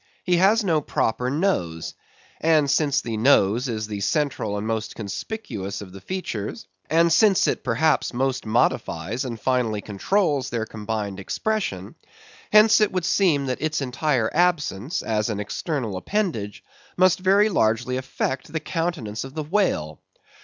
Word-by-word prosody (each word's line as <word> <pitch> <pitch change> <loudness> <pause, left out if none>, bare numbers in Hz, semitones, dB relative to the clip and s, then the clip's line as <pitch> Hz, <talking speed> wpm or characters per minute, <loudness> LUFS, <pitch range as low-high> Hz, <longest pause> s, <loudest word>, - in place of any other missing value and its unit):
He 180 -1 +2
has 205 +5 +4
no 165 -6 +2
proper 125 -2 -1
nose. 130 - -1 0.5
And 155 -3 +3
since 140 -1 +2
the 115 -2 -4
nose 115 0 +3
is 110 -2 -2
the 105 -1 -5
central 120 -4 -1
and 105 - -4
most 110 -1 -3
conspicuous 100 - -5
of 100 -3 -9
the 95 - -10
features; 110 - -5 0.2
and 165 +1 +4
since 205 -2 +4
it - - -1
perhaps 140 +5 +1
most 130 +1 -1
modifies 115 +2 0
and 120 -3 -5
finally 120 -3 0
controls 140 - 0
their 115 -2 -2
combined 105 -2 -4
expression; 100 - -3 0.6
hence 215 +1 +6
it 210 - +3
would 185 -2 -1
seem 165 -8 +2
that 130 0 -3
its 155 0 0
entire 130 -3 0
absence, 155 - 0
as 105 0 0
an 105 -2 -2
external 115 - -3
appendage, 115 - -2 0.3
must 185 0 +4
very 200 +3 +4
largely 120 - +1
affect 130 0 -3
the 160 - -2
countenance 155 - -3
of 135 +2 -10
the 155 - -2
whale. 150 - 0
130 Hz, 150 wpm, -23 LUFS, 110-170 Hz, 0.6 s, hence